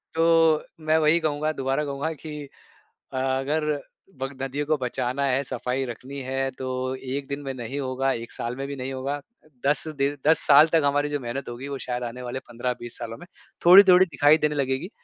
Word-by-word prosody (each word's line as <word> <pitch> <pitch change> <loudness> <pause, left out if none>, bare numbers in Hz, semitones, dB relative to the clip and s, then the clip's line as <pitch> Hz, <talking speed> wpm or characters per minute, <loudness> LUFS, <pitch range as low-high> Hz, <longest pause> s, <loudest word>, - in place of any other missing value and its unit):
तो 165 -1 +4 0.2
मैं 155 +1 +4
वही 160 +2 +4
कहूँगा, 155 -1 0
दोबारा 135 0 -1
कहूँगा 140 +3 -3
कि 150 -1 -8 0.7
अ, - - -3
अगर 135 +4 0 0.6
बग 135 0 -5
नदियों 135 +2 -2
को 155 +1 +2
बचाना 130 +1 -2
है, 135 0 +2
सफ़ाई 125 +1 -2
रखनी 130 +4 -7
है 135 +1 -1
तो 130 -1 -4 0.3
1 135 +1 -5
दिन 140 0 -4
में 135 - -4
नहीं 130 +2 -5
होगा, 135 0 0
1 115 -1 -5
साल 120 +1 -4
में 135 - -4
भी 140 - -5
नहीं 135 0 -5
होगा। 135 +2 -3 0.5
10 145 +2 +2
दिन 140 +1 0
10 160 - +5
साल 150 +2 +8
तक 160 - +5
हमारी 145 +1 +1
जो 145 -1 -2
मेहनत 125 +2 -5
होगी 120 +3 -7
वो 140 -1 -4
शायद 125 -1 -3
आने 120 +1 -6
वाले 125 +1 -4
15-20 120 0 -4
सालों 115 -1 -6
में - - -12 0.4
थोड़ी-थोड़ी 185 0 +9
दिखाई 145 -1 +4
देने 150 -1 0
लगेगी। 135 +5 -1
135 Hz, 195 wpm, -25 LUFS, 130-150 Hz, 0.7 s, थोड़ी-थोड़ी